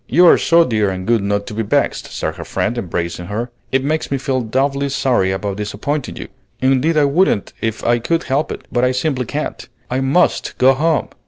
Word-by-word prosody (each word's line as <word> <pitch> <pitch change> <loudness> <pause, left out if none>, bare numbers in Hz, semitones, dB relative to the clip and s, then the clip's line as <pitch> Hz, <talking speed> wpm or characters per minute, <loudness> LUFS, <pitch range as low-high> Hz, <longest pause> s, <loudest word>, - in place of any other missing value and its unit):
"You 175 +7 +5
are - - +7
so 170 0 +5
dear 110 -4 +1
and 95 -1 -4
good 115 -1 +2
not 100 0 -1
to 115 - -7
be 110 - -2
vexed," 105 - 0
said - - -3
her - - -6
friend, 120 - -2
embracing 85 -5 -3
her. 115 +5 -4 0.2
"It 135 0 +1
makes 155 +3 -1
me 140 - 0
feel 135 -1 -1
doubly 140 +4 0
sorry 125 -8 +1
about 95 +1 -3
disappointing 110 +8 -3
you. - - -7 0.3
Indeed 135 +5 +2
I 150 - +5
wouldn't 140 - +1
if 110 0 -2
I 120 0 +2
could 165 +8 0
help 140 +4 -1
it, - - -7
but 120 0 +1
I 125 0 +3
simply 130 -1 -1
can't. 150 +6 -5 0.2
I 130 - 0
must 135 +7 +1
go 130 +1 +5
home. 155 +3 0
125 Hz, 215 wpm, -18 LUFS, 110-140 Hz, 0.3 s, are